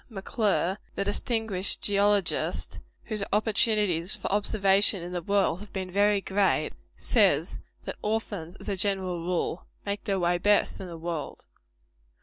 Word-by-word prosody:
M'Clure, 200 -3 -1 0.2
the - - 0
distinguished 205 -1 -1
geologist, 205 -2 +1 0.2
whose 215 -3 -4
opportunities 210 -5 +2
for - - -4
observation 200 -2 +3
in 175 - -6
the 175 -1 -3
world 195 -1 +1
have 210 0 -11
been 185 -2 -4
very 205 +1 +3
great, 195 0 +1 0.2
says - - +2 0.3
that - - -5
orphans, 205 -6 -3
as - - -11
a 200 - -1
general 190 -2 0
rule, 175 0 -2 0.2
make 200 0 -4
their 195 -3 0
way 175 0 +1
best 205 +3 +2
in 190 - -6
the 170 -1 -8
world. 165 -2 -5
195 Hz, 140 wpm, -27 LUFS, 180-205 Hz, 0.3 s, observation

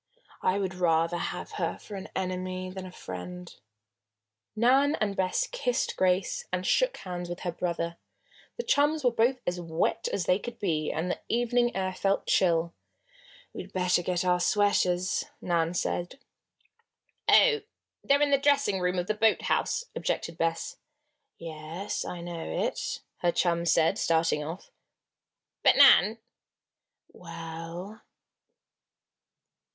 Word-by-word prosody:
I 185 - +2
would 190 -2 -2
rather 170 -1 +1
have - - -4
her - - -1
for 210 - -12
an 190 - -7
enemy 185 0 -3
than 185 0 -7
a - - -10
friend." 180 - -8 1.0
Nan 265 +6 +4
and 205 -2 -1
Bess 190 - +1
kissed - - -1
Grace 190 - +1
and - - -2
shook - - +2
hands 180 -1 -6
with 175 +1 -6
her 175 - -2
brother. 170 -1 -3 0.6
The 475 - -3
chums 295 -2 +2
were 245 - +4
both 240 +3 +2
as 175 0 -2
wet 165 0 -1
as 190 - -1
they 180 +2 +3
could 240 +1 -7
be, 155 -7 -1
and 175 +3 -2
the - - -3
evening 240 +1 +1
air 190 -1 -1
felt 195 +2 0
chill. 170 -2 +2 0.8
"We'd - - -8
better 180 -1 +2
get 180 +1 -1
our 180 -1 +3
sweaters," 185 -2 +2
Nan 170 -1 0
said. 175 +4 -2 1.1
"Oh! 450 -3 +6 0.4
they're 285 +1 +4
in 290 - +1
the 275 - +4
dressing 280 -9 +2
room 180 0 0
of 175 - 0
the 215 - 0
boathouse," 225 - +1
objected 165 - -2
Bess. 165 0 -2 0.6
"Yes, 165 +4 -5
I 175 - -6
know 170 -1 -6 0.2
it," - - -3 0.2
her 175 - +1
chum 170 -1 +1
said, 165 0 +3
starting 160 -2 +2
off. 165 +5 -8 0.9
"But, - - +5
Nan!" 220 +2 +7 1.0
"Well?" 165 +4 -8
185 Hz, 135 wpm, -28 LUFS, 170-220 Hz, 1.1 s, Nan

